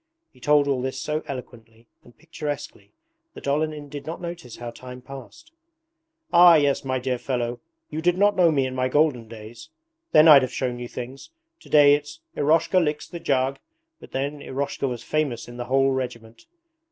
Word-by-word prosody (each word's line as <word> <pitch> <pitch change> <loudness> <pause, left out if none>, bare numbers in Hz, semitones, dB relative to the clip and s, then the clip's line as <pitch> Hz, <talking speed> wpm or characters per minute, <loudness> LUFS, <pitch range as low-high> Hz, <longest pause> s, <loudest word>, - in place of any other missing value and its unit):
He 130 - -21
told 145 +2 +3
all 135 -3 0
this 130 +1 -3
so 155 0 -2
eloquently 115 -3 -9 0.2
and 120 - -20
picturesquely 150 -2 -7 0.4
that - - -9
Olenin 150 +1 -1
did 145 +1 -9
not 165 - -5
notice 170 -8 -7
how 120 -1 -7
time 125 +1 -10
passed. 135 - -12 0.8
'Ah 175 -1 +8
yes, 145 -3 +2
my 130 -1 -1
dear 125 -1 -2
fellow, 120 -2 -3 0.3
you 155 - -3
did 175 +1 +2
not 205 +1 +3
know 175 -2 +5
me 140 -4 +1
in 130 - -4
my 130 0 -1
golden 140 -5 +1
days; 110 +1 -11 0.4
then 155 +1 +7
I'd 145 -3 +9
have 130 - -2
shown 125 -2 -3
you 120 - -6
things. 125 +3 -8 0.3
Today 145 - +5
it's 145 +1 -3 0.2
"Eroshka 160 +5 +3
licks 150 -1 -2
the 170 - -8
jug", 135 -3 0 0.4
but - - -13
then 140 +2 -3
Eroshka 140 +1 -3
was 125 -2 -5
famous 150 -6 -2
in 120 0 -10
the 120 - -4
whole 135 +2 +2
regiment. 120 - -6
135 Hz, 180 wpm, -24 LUFS, 125-150 Hz, 0.8 s, I'd